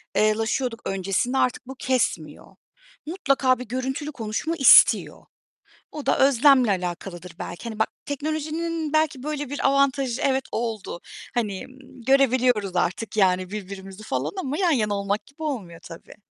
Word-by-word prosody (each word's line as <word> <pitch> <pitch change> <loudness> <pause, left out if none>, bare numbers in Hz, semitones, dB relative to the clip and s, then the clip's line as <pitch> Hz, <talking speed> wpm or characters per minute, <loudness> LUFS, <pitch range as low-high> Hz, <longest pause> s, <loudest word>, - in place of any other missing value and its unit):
eee, 215 0 +3
laşıyorduk 230 +2 -2
öncesinde 195 +7 -1
artık 255 -1 0
bu 265 - -7
kesmiyor. 230 - -2 0.5
Mutlaka 275 -7 +1
bir 250 - -6
görüntülü 265 +5 -3
konuşma 230 +6 -3
istiyor. 270 -6 +6 0.7
O 300 - -7
da - - +2
özlemle 270 -2 +5
alakalıdır 180 -1 -5
belki, 175 - -7
hani 225 -2 -6
bak, 220 - +1 0.2
teknolojinin 310 +2 -3
belki 310 -4 +1
böyle 290 -2 -4
bir 285 - -1
avantajı, 275 -2 +1
evet 265 -1 +1
oldu. 220 -6 -3 0.3
Hani, 210 -6 -2 0.4
görebiliyoruz 250 -7 +3
artık 180 +6 -1
yani 185 -2 +2
birbirimizi 195 -1 -8
falan 140 -5 -2
ama 280 +3 -3
yan 365 -3 +2
yana 215 -8 +1
olmak 200 +1 -2
gibi 280 +3 -14
olmuyor 200 - -4
tabii. 165 -1 -12
250 Hz, 140 wpm, -24 LUFS, 200-275 Hz, 0.7 s, istiyor